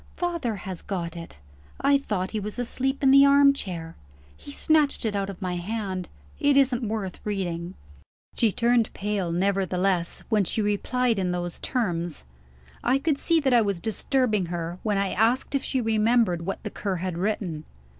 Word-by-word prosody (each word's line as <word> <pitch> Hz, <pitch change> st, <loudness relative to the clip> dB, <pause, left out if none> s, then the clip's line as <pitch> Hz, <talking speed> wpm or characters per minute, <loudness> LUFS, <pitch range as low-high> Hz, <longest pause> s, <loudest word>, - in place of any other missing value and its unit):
"Father 340 Hz, -11 st, -2 dB
has 190 Hz, -2 st, -7 dB
got 175 Hz, -4 st, -4 dB
it. 165 Hz, -, -9 dB, 0.4 s
I 280 Hz, +1 st, +4 dB
thought 190 Hz, -8 st, -2 dB
he 220 Hz, -, -2 dB
was 210 Hz, +2 st, -6 dB
asleep 265 Hz, +3 st, -2 dB
in 265 Hz, -, +6 dB
the 275 Hz, +1 st, +8 dB
armchair. 275 Hz, -13 st, +3 dB, 0.4 s
He -, -, -13 dB
snatched 295 Hz, -2 st, +2 dB
it 215 Hz, -2 st, -1 dB
out 195 Hz, 0 st, -1 dB
of 195 Hz, 0 st, -7 dB
my 180 Hz, -1 st, -2 dB
hand. 190 Hz, -1 st, -4 dB, 0.3 s
It 285 Hz, -1 st, +3 dB
isn't 265 Hz, -3 st, +3 dB
worth 215 Hz, -5 st, -3 dB
reading." 180 Hz, -4 st, -3 dB, 0.6 s
She 225 Hz, -3 st, +3 dB
turned 235 Hz, +1 st, +2 dB
pale, 200 Hz, -4 st, -2 dB
nevertheless, 185 Hz, -1 st, 0 dB
when 215 Hz, -3 st, +2 dB
she 190 Hz, -, -2 dB
replied 225 Hz, +3 st, +1 dB
in 185 Hz, -1 st, 0 dB
those 175 Hz, -1 st, -3 dB
terms. 175 Hz, -, -2 dB, 0.6 s
I 260 Hz, -, +3 dB
could 280 Hz, 0 st, 0 dB
see 335 Hz, -1 st, +3 dB
that 265 Hz, -3 st, +2 dB
I 240 Hz, -, +6 dB
was 200 Hz, -4 st, -1 dB
disturbing 220 Hz, -1 st, 0 dB
her, 170 Hz, +1 st, -4 dB
when 210 Hz, -2 st, 0 dB
I 195 Hz, -1 st, 0 dB
asked 230 Hz, +7 st, +1 dB
if 275 Hz, -, 0 dB
she 260 Hz, -, -1 dB
remembered 220 Hz, -6 st, +2 dB
what 195 Hz, -, -4 dB
the 210 Hz, -, -5 dB
Cur 195 Hz, -2 st, -3 dB
had 180 Hz, 0 st, -3 dB
written. 185 Hz, -6 st, -2 dB
210 Hz, 175 wpm, -26 LUFS, 180-250 Hz, 0.6 s, the